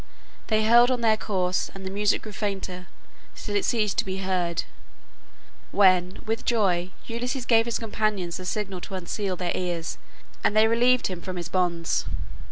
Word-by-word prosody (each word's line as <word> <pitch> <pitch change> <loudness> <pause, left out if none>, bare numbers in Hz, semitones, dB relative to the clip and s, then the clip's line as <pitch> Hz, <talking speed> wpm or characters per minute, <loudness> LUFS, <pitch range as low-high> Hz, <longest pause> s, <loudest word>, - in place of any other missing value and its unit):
They 215 -1 +2
held 235 +2 +6
on 250 -2 0
their 220 -2 +4
course, 185 -4 -1
and 190 0 -8
the 190 - -4
music 205 +1 +1
grew 215 - -7
fainter 195 -3 -4 0.5
till 205 - -5
it 205 - +2
ceased 215 -4 +1
to - - +3
be 190 0 -3
heard, 185 -3 -1 1.1
when 185 -2 +3
with 225 +1 -2
joy 185 -6 +1 0.2
Ulysses 245 +2 -3
gave 225 -2 +4
his 235 - 0
companions 210 -5 -1
the 185 - -8
signal 195 -2 -3
to 195 - -6
unseal 185 +1 -3
their 180 -1 -2
ears, 175 -2 -3 0.4
and 210 - +2
they 220 +1 +6
relieved 245 +2 +3
him 180 -2 -3
from 185 -1 -5
his 175 -2 -5
bonds. 175 -2 0
195 Hz, 175 wpm, -26 LUFS, 180-220 Hz, 1.1 s, held